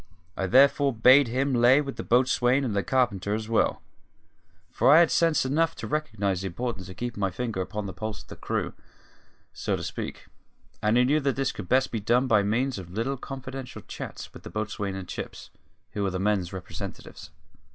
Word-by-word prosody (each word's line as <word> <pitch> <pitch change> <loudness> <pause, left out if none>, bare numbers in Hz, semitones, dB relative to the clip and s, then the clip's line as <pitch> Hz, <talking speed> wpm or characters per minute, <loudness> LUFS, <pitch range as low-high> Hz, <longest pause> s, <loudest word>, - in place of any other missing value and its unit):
I 95 - -2
therefore 140 +4 +5
bade 125 +4 +6
him 130 +4 0
lay 120 +3 +5
for 140 -2 -2
the - - -7
boatswain 125 +2 +2
and 115 -6 -2
the 100 - +2
carpenter 105 -5 0
as 110 0 -4
well; 115 -1 +1 0.9
for - - +2
I 150 - +9
had 170 -1 +5
sense 165 -5 +3
enough 160 +5 +1
to - - -7
recognise 105 -11 -1
the 95 - -3
importance 95 0 -4
of 95 - -9
keeping 120 -3 -4
my 95 - +2
finger 110 0 -3
upon 105 +2 -4
the 95 - -5
pulse 110 -1 -6
of - - -30
the - - -9
crew, - - -3 0.8
so - - -2
to - - -6
speak, - - -6 0.6
and 105 +2 +2
I 125 - +5
knew 145 +5 +3
that 140 -2 0
this 135 -1 0
could 90 - -8
best 130 +1 +3
be 115 - -2
done 120 +5 +2
by 110 -5 +4
means 120 +4 0
of 90 -2 -9
little 115 +9 -2
confidential 135 -1 -8
chats - - -8
with - - -11
the - - -9
boatswain 105 -2 -3
and 95 -1 -6
Chips, - - -7 0.4
who 105 - -4
were 100 - +1
the 95 - -3
men's 95 -2 0
representatives. 90 -1 -8
120 Hz, 205 wpm, -26 LUFS, 100-135 Hz, 0.9 s, I